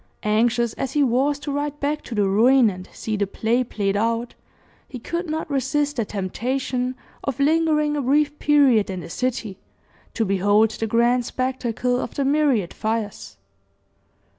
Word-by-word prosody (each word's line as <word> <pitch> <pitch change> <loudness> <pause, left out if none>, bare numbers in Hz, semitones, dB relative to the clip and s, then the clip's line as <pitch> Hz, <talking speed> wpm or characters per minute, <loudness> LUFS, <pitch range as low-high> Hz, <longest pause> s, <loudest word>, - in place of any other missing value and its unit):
Anxious 230 +2 +1
as 265 -1 -4
he 295 - +3
was 270 +3 +2
to 290 0 -5
ride 290 +1 -3
back 295 +1 -1
to 235 - -6
the 205 -2 +2
ruin, 230 +4 +4
and 185 0 -10
see 220 - -4
the 200 -1 0
play 230 +5 0
played 200 -4 -2
out, 230 +3 -1 0.6
he 255 - -7
could 340 +8 -4
not 315 +1 -3
resist 285 +1 -1
the 230 - 0
temptation 250 +6 -2 0.3
of 275 -2 -3
lingering 300 0 +2
a 290 - -1
brief 290 +3 +1
period 275 -9 +4
in 185 -2 -4
the 165 0 -9
city, 225 -5 -3 0.6
to 225 - +1
behold 205 +3 +3
the 225 +1 -3
grand 235 +2 +2
spectacle 250 -1 -1
of - - -5
the 280 - 0
myriad 275 - +2
fires. 205 - -4
245 Hz, 165 wpm, -22 LUFS, 215-280 Hz, 0.6 s, ruin